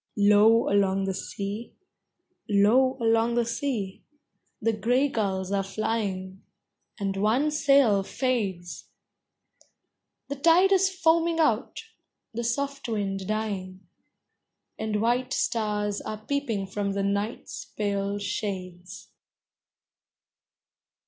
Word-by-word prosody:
Low 210 Hz, +2 st, +5 dB
along 195 Hz, -1 st, +2 dB
the 195 Hz, 0 st, -1 dB
sea, 200 Hz, +4 st, -6 dB, 0.7 s
low 230 Hz, +6 st, +4 dB
along 230 Hz, 0 st, +2 dB
the 240 Hz, -1 st, +2 dB
sea, 230 Hz, -5 st, -3 dB, 0.6 s
The 225 Hz, +1 st, +1 dB
gray 245 Hz, +6 st, +2 dB
gulls 190 Hz, -5 st, -2 dB
are 200 Hz, -1 st, +1 dB
flying, 195 Hz, -2 st, -3 dB, 0.6 s
and 195 Hz, -1 st, -2 dB
one 235 Hz, +9 st, +2 dB
sail 275 Hz, -8 st, +4 dB
fades; 195 Hz, -7 st, -2 dB, 1.4 s
The 280 Hz, -, -5 dB
tide 335 Hz, +6 st, +5 dB
is 385 Hz, 0 st, +4 dB
foaming 335 Hz, -2 st, +2 dB
out; 270 Hz, -, +1 dB, 0.5 s
the 235 Hz, +1 st, -3 dB
soft 275 Hz, +2 st, -2 dB
wind 195 Hz, -3 st, -2 dB
dying; 195 Hz, -4 st, -4 dB, 0.9 s
And 215 Hz, -1 st, -1 dB
white 250 Hz, +3 st, +1 dB
stars 210 Hz, -3 st, -1 dB
are 215 Hz, 0 st, -7 dB
peeping 245 Hz, -9 st, -1 dB
from 200 Hz, +1 st, -3 dB
the 200 Hz, 0 st, -1 dB
night's 200 Hz, +3 st, -3 dB
pale 200 Hz, -1 st, -2 dB
shades. 185 Hz, -2 st, -5 dB
215 Hz, 100 wpm, -26 LUFS, 195-245 Hz, 1.4 s, Low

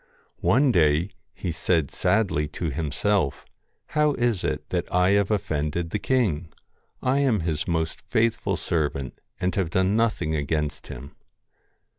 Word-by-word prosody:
One 135 Hz, -1 st, +4 dB
day 80 Hz, 0 st, +3 dB, 0.2 s
he 90 Hz, -, -4 dB
said 80 Hz, -3 st, 0 dB
sadly 95 Hz, -9 st, +1 dB
to 85 Hz, -4 st, -1 dB
himself: 80 Hz, +2 st, 0 dB, 0.2 s
' -, -, -48 dB
How 150 Hz, -1 st, +4 dB
is 120 Hz, -6 st, 0 dB
it -, -, -2 dB
that -, -, -2 dB
I 90 Hz, +1 st, +3 dB
have 100 Hz, -1 st, +3 dB
offended 85 Hz, -5 st, -1 dB
the -, -, -1 dB
king? 95 Hz, -, 0 dB, 0.5 s
I 130 Hz, +2 st, +2 dB
am 125 Hz, -9 st, +2 dB
his 80 Hz, -2 st, -2 dB
most 80 Hz, -1 st, -1 dB
faithful 110 Hz, -4 st, +1 dB
servant, 75 Hz, -6 st, -2 dB, 0.2 s
and 90 Hz, 0 st, 0 dB
have 95 Hz, -5 st, 0 dB
done 95 Hz, +3 st, +2 dB
nothing 110 Hz, -8 st, +1 dB
against 75 Hz, 0 st, -2 dB
him.' 70 Hz, +3 st, -9 dB
90 Hz, 145 wpm, -25 LUFS, 75-105 Hz, 0.5 s, One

